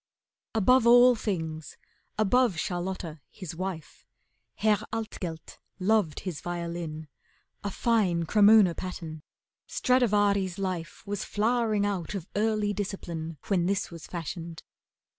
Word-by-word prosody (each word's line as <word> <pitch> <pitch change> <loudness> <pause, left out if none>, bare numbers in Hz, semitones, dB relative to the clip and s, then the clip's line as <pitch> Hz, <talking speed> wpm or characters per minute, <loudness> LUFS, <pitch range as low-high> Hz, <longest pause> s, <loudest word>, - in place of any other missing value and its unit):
Above 235 +3 +4
all 245 +1 +8
things, 160 -8 -4 0.4
above 215 -1 +3
Charlotta 175 -3 -3
his 180 -5 -8
wife, 180 -3 -6 0.5
Herr 210 -1 +2
Altgelt 200 -7 -5 0.2
loved 195 -4 +1
his 180 -6 -5
violin, 170 -3 -4 0.6
a 205 - -1
fine 195 -6 +1
Cremona 205 -1 +6
pattern, 165 -4 -6 0.5
Stradivari's 205 -6 +2
life 185 -4 -4
Was 205 -1 -3
flowering 220 -1 +1
out 200 -1 -2
of 185 -5 -4
early 210 -1 +1
discipline 170 -5 -5
When 180 -3 +1
this 195 -1 -1
was 170 -2 -9
fashioned. 170 -1 -6
190 Hz, 110 wpm, -28 LUFS, 170-215 Hz, 0.6 s, all